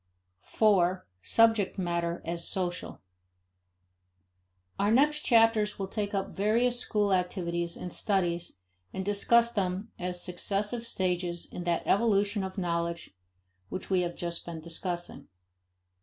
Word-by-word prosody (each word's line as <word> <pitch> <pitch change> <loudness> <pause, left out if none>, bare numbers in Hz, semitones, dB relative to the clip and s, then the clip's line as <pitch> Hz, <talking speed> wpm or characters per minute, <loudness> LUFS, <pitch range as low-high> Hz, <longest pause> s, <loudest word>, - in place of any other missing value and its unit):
4. 185 - +2 0.2
Subject 225 - +3
Matter 170 -2 -2
as 170 +1 -3
Social. 180 - -3 1.8
Our 200 - +2
next 295 +6 +4
chapters 225 -4 +3
will 195 - -2
take 205 -1 -3
up 195 -1 -3
various 235 +5 +2
school 205 -4 +1
activities 175 -2 -1
and 180 - -6
studies 175 - -1 0.4
and 190 0 -4
discuss 235 +3 +3
them 195 +1 -2
as 180 0 0
successive 205 +6 -2
stages 180 -3 -2
in 175 - -5
that 170 -1 0
evolution 205 -1 +2
of 190 +1 -6
knowledge 170 - -2 0.6
which 185 +1 -6
we 185 -1 +3
have 175 -1 -3
just 170 -1 -4
been 170 -1 -7
discussing. 170 -2 -5
190 Hz, 125 wpm, -29 LUFS, 175-210 Hz, 1.8 s, next